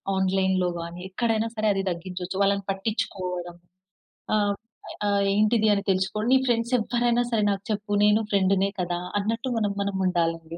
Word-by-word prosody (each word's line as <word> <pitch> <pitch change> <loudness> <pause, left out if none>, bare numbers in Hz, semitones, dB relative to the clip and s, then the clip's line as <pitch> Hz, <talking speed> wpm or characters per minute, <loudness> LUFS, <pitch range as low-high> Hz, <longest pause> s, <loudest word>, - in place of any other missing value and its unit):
ఆన్‌లైన్‌లో 190 -1 +1
గాని 170 +1 -7
ఎక్కడైనా 225 +2 0
సరే 215 0 0
అది 195 0 -1
తగ్గించొచ్చు. 180 +1 -5
వాళ్ళని 200 0 +1
పట్టిచ్చుకోవడం. 185 -4 -3 0.8
ఆహ్, 205 -1 +2 0.5
ఆ - - +2 0.3
ఏంటిది 215 +1 +3
అని 200 - -2
తెలుసుకొని 190 +4 -1
నీ 265 - +6
ఫ్రెండ్స్ 235 +1 0
ఎవ్వరైనా 240 +1 +1
సరే 220 -2 +2
నాకు 195 0 -3
చెప్పు 205 0 -1
నేను 210 +1 +4
ఫ్రెండ్‌నే 195 0 +2
కదా! 175 0 -2 0.2
అన్నట్టు 225 +5 -2
మనం, 205 -2 0
మనం 200 -1 -3
ఉండాలండి 165 -2 -1
200 Hz, 150 wpm, -25 LUFS, 185-215 Hz, 0.8 s, నీ